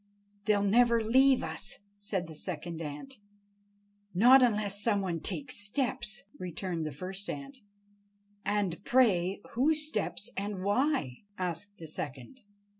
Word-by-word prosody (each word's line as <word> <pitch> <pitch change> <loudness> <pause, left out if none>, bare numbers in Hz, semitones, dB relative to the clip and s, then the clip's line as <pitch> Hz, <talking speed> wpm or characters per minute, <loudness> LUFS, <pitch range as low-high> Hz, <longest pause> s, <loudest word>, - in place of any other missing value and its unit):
"They'll 205 -2 +3
never 235 +2 +4
leave 260 +4 +5
us," 160 +5 -2 0.2
said 200 -3 -2
the 160 - -9
second 165 +1 -4
ant. 160 - -7 1.0
"Not 250 +8 +8
unless 210 -4 +2
some 210 -2 +2
one 175 -4 -2
takes 265 - -3
steps," 240 +1 -2 0.2
returned 175 -2 -3
the - - -4
first 190 +7 -6
ant. 275 -1 -6 0.8
"And, 200 -3 -1
pray, 200 -7 +3
whose 300 +5 +2
steps, 260 -8 -2
and 200 -1 -3
why?" 205 - 0
asked 185 +3 -4
the 165 - -9
second. 145 - -6
205 Hz, 125 wpm, -31 LUFS, 175-245 Hz, 1.0 s, Not